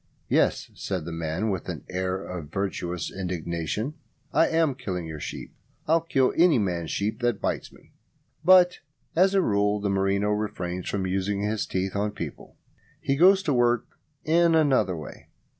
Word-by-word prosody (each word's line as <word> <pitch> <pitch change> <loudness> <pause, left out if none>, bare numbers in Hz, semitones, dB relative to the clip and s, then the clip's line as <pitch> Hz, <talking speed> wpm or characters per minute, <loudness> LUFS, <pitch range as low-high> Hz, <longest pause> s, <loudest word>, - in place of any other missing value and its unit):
"Yes," - - +1
said 90 -5 -4
the 85 - -5
man, 80 +6 -2
with 95 -3 -4
an - - -5
air 95 +1 -2
of 85 -5 -7
virtuous 90 -3 -3
indignation. 90 - -3 0.4
"I 165 - +4
am 160 -3 +2
killing 95 -10 -4
your 80 -1 -7
sheep. - - -7 0.3
I'll 165 +2 +4
kill 135 -5 +1
any 170 -4 +5
man's 90 -6 -1
sheep 105 +3 -2
that 120 -3 +1
bites - - -2
me!" - - -20 0.5
But 180 0 +6 0.4
as 190 +3 +4
a 190 - +4
rule 105 -2 +1
the 100 -1 -1
merino 100 +1 +1
refrains 95 -4 -3
from 95 -2 -1
using 95 +2 -1
his 105 0 -1
teeth 95 +1 -2
on 105 +1 -1
people. - - -8 0.4
He 135 - 0
goes 190 +5 +6
to 150 -7 +1
work 120 -1 +2 0.4
in 165 +1 +4
another 135 - +3
way. 75 -4 -10
100 Hz, 165 wpm, -26 LUFS, 90-135 Hz, 0.5 s, But